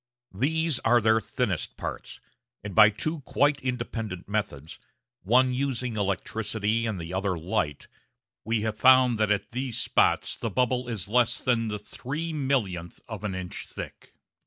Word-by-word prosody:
These 155 - +1
are 120 +1 +4
their 110 0 +3
thinnest - - -2
parts, - - -6 0.4
and 100 -2 -6
by 105 0 +8
two 155 +10 -3
quite 145 +1 +1
independent 115 -7 -4
methods 100 -8 -3 0.4
one 125 +6 +4
using 125 -3 -1
electricity 110 +2 -1
and 105 -4 -3
the 85 +2 -6
other 95 -1 0
light 75 -3 -2 0.6
we 110 0 0
have 110 0 -3
found 130 -3 +6
that 110 -1 +2
at 100 -1 0
these 125 -1 -2
spots - - +2
the 115 - -3
bubble 125 +3 0
is 105 -6 -3
less 120 +1 +2
than 120 -3 +2
the 105 -1 -2
three 150 +10 -5
millionth 110 - -1
of - - -7
an 100 -3 -2
inch 90 -1 -6
thick! - - -9
115 Hz, 155 wpm, -27 LUFS, 100-125 Hz, 0.6 s, by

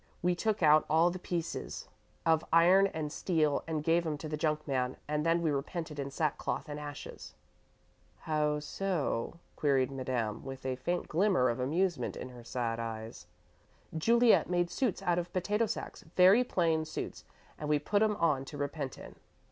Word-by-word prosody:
We 180 0 +3
took 215 +2 -1
out 155 0 +6
all 165 +3 +4
the 185 - -6
pieces 175 -2 -4 0.4
of 160 -1 +3
iron 180 +4 +6
and 155 -5 -4
steel 155 -5 +1
and 155 -2 -2
gave 165 +2 +3
'em 155 -3 -2
to 155 - -6
the 155 - -3
junk 150 0 -1
man, 130 -2 -1
and 150 0 -1
then 165 +1 +2
we 160 - +2
repented 150 +2 -4
in 140 0 -3
sackcloth 150 +2 -2
and 150 0 -5
ashes." 145 -1 -8 0.9
"How 150 -1 0
so?" 165 -5 -2 0.2
queried 135 -3 +2
Madame, 125 -5 -2
with 135 0 -8
a 130 -1 -1
faint 175 +8 -2
glimmer 180 -6 +3
of 120 - -2
amusement 155 +1 0
in - - -6
her 120 -1 -12
sad 115 -1 -2
eyes. 115 -1 -6 0.7
"Juliet 230 +8 +4
made 175 -1 +1
suits 250 -4 -1
out 175 0 +2
of 175 0 -5
potato 210 +5 +1
sacks 220 - -5
very 190 +7 +7
plain 165 -8 +1
suits 155 - -6 0.4
and 150 - -4
we 150 - +4
put 205 +8 0
'em 215 -1 +3
on 150 -8 +1
to 145 +2 -8
repent 145 -2 -4
in." - - -11
155 Hz, 175 wpm, -31 LUFS, 140-175 Hz, 0.9 s, very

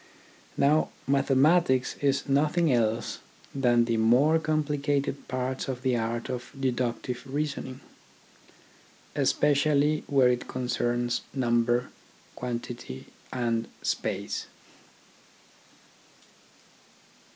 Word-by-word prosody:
Now 150 +3 +3 0.2
mathematics 135 0 +3
is 140 0 +1
nothing 150 +2 +2
else 115 -1 0 0.3
than 120 -3 +3
the 115 -1 0
more 130 +9 +4
complicated 145 -2 -1
parts 130 +1 -3
of 130 -1 -4
the 130 -2 +2
art 115 0 -2
of 125 -1 -5
deductive 125 -1 -2
reasoning, 135 -2 -4 1.3
especially 150 +1 +2
where 135 -3 +4
it 125 0 -1
concerns 120 -1 -1
number, 120 -1 +1 0.4
quantity, 120 - -6 0.2
and 115 -2 -1 0.2
space. - - -2
130 Hz, 85 wpm, -27 LUFS, 120-140 Hz, 1.3 s, more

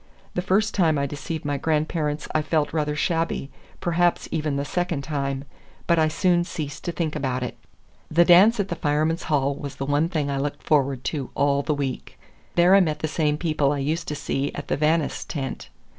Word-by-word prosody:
The 180 - -1
first 210 +4 +1
time 165 -6 +3
I 140 - +1
deceived 145 +3 -5
my 145 -1 0
grandparents 155 0 -1
I 155 - +2
felt 155 -1 0
rather 150 -2 0
shabby, 165 -3 -1 0.3
perhaps 175 0 +1
even 155 -3 -1
the 140 0 -1
second 170 -2 -2
time, 140 -2 -2 0.4
but 170 -1 +3
I 155 - +4
soon 175 +2 +2
ceased 155 -4 -6
to 175 - -1
think 165 -3 -2
about 130 -3 -1
it. 125 - -4 0.5
The 170 +2 +4
dance 195 +6 +7
at 200 -1 0
the 175 - -2
Firemen's 155 +2 0
Hall 140 -2 +2
was 140 -1 -7
the 135 - -4
one 145 +4 +1
thing 150 -5 -1
I 135 - -1
looked 145 +1 -3
forward 135 -4 +1
to 140 -4 -3
all 140 0 +2
the 150 +1 -1
week. 140 -2 -4 0.4
There 175 +2 +5
I 200 - +8
met 155 -5 +1
the 155 - 0
same 150 -1 0
people 155 -4 +1
I 145 - -1
used 155 +5 -2
to 150 - -2
see 140 0 -2
at 145 - -7
the - - +2
Vannis' 155 +1 +1
tent. 135 -4 -5
150 Hz, 205 wpm, -24 LUFS, 140-170 Hz, 0.5 s, I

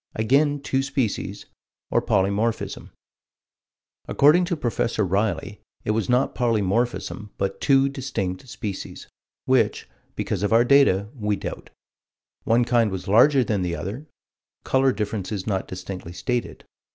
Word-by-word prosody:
Again 140 +6 +2
two 135 -1 0
species, 135 -6 -2 0.5
or - - +3
polymorphism. 100 +4 -1 1.2
According 155 +6 +5
to 170 -1 -2
Prof. 120 -4 -1
Riley, 100 -1 -1 0.2
it - - +1
was 110 -3 -1
not 125 +2 +2
polymorphism, 115 -1 -1
"but 100 0 -3
two 135 -1 +4
distinct 125 -7 -4
species" 105 -6 -6 0.4
which, - - +1 0.3
because - - -2
of 105 - 0
our 115 +2 +5
data, 120 -8 +4
we 105 -6 -1
doubt. - - -7 0.8
One 120 +1 +3
kind 120 -2 +3
was 95 -2 -6
larger 125 +7 +5
than 105 -5 -1
the 90 -1 -1
other: 115 - -6 0.6
color 135 0 +3
differences 105 -3 -3
not 95 -3 -2
distinctly 90 -1 -7
stated. 120 +7 -3
110 Hz, 125 wpm, -24 LUFS, 100-130 Hz, 1.2 s, According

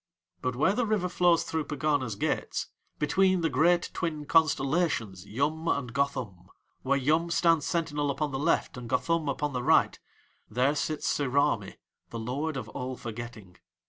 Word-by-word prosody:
But 125 -1 -1
where 155 +9 +3
the 235 +1 0
River 210 -4 +1
flows 175 -1 +3
through 160 -2 -2
Pegana's 145 -6 -1
gates, - - -2 0.3
between 185 +4 +2
the 165 -2 0
great 170 +6 +3
twin 155 -4 -3
constellations 140 - +1
Yum 155 +8 -1
and 125 -7 -1
Gothum, 125 -10 -2 0.3
where 140 +1 +1
Yum 155 +5 +1
stands 165 -2 +3
sentinel 150 -4 -1
upon 145 +1 -1
the 135 - -3
left 160 -3 +1
and 120 -2 -7
Gothum 165 +1 +1
upon 145 +1 -2
the 125 - -1
right, - - +3 0.5
there 125 +6 +2
sits 150 +1 -2
Sirami, 140 -7 +1 0.3
the 115 - -6
lord 135 +6 -3
of 120 -4 -5
All 125 +2 -5
Forgetting. 110 -5 -8
145 Hz, 155 wpm, -28 LUFS, 125-165 Hz, 0.5 s, where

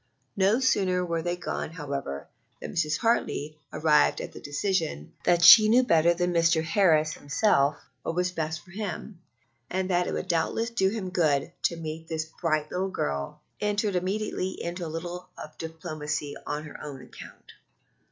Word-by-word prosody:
No 200 +4 +3
sooner 185 -8 +2
were 165 -1 -1
they 175 +1 -1
gone, 175 -2 -4
however, 140 - -5 0.3
than - - -6
Mrs. 155 -2 +1
Hartley, 155 -9 0
arriving 150 -1 +3
at - - -12
the - - -9
decision 145 - -2
that 175 -1 +4
she 215 +4 +10
knew 245 +3 +5
better 170 -7 +4
than 175 0 0
Mr. 165 -1 +3
Harris 160 -3 +3
himself 145 -2 +2 0.2
what 165 - -3
was 180 0 +1
best 160 -1 -3
for 185 - -16
him, 195 -1 -6 0.5
and 185 +1 -1
that 175 0 +2
it - - -2
would - - -3
doubtless 210 +6 0
do 190 -5 +2
him 195 -3 -4
good 155 -4 +1
to 170 - +1
meet 160 0 -6
this 160 -1 -2
bright 155 -1 -2
little 190 +2 -1
girl, 70 - -3 0.2
entered 210 -1 0
immediately 190 0 -2
into 170 0 -4
a - - -5
bit 165 +2 -5
of 175 -3 -9
diplomacy 155 -2 -4
on 150 +1 -3
her 150 - -10
own 135 -3 -8
account. - - -13
170 Hz, 170 wpm, -27 LUFS, 155-185 Hz, 0.5 s, she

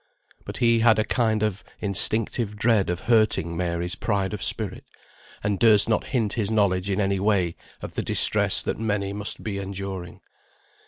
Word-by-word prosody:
But - - -7
he 115 -1 +3
had 115 -1 +4
a 110 - +2
kind 110 -2 0
of 105 -3 -2 0.2
instinctive 105 +2 +2
dread 110 -3 +1
of 90 0 -3
hurting 110 -7 +1
Mary's 85 0 -2
pride 100 -2 -2
of 105 - -6
spirit, - - -1 0.6
and 100 -2 -1
durst 110 -3 +5
not 110 - 0
hint 115 -6 -1
his 105 -4 -1
knowledge 100 -3 +1
in 95 - -1
any 100 -1 0
way 95 -4 0 0.3
of - - -7
the - - -2
distress - - +3
that - - -3
many 100 -3 -2
must 105 0 -3
be 100 -2 -4
enduring. 95 -2 -7
100 Hz, 170 wpm, -24 LUFS, 95-110 Hz, 0.6 s, durst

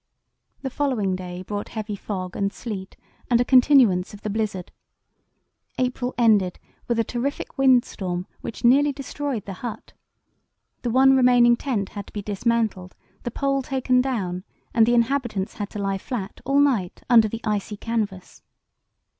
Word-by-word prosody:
The 265 - -3
following 240 -10 0
day 180 0 -7
brought 205 +2 -5
heavy 215 -2 -4
fog 185 -2 -5
and 200 0 0
sleet, 200 -5 -7 0.3
and 240 -2 +4
a 245 - +2
continuance 245 -9 +5
of 205 - -14
the 210 - -3
blizzard. 205 -4 -3 1.1
April 250 0 -1
ended 210 -6 +3 0.3
with 235 - 0
a 230 - +3
terrific 250 +5 -4
windstorm 205 -9 +2
which 230 - -7
nearly 280 +4 +5
destroyed 275 -4 -4
the 195 - -6
hut. 240 -3 -6 0.9
The 245 - -2
one 265 +3 +5
remaining 245 -2 +5
tent 235 -7 -2
had 205 -2 -7
to - - -15
be 205 - -4
dismantled, 210 -2 -1 0.3
the - - -3
pole 275 +3 0
taken 255 -1 +1
down, 190 -9 -2 0.3
and 225 -1 +5
the 240 - +4
inhabitants 235 -5 0
had 205 -2 -4
to - - -8
lie 195 -1 -1
flat 200 -3 -5
all 275 +1 +3
night 240 -11 +1
under 230 -3 +6
the 230 +2 -6
icy 210 -1 -2
canvas. 210 -5 -4
230 Hz, 155 wpm, -24 LUFS, 200-255 Hz, 1.1 s, under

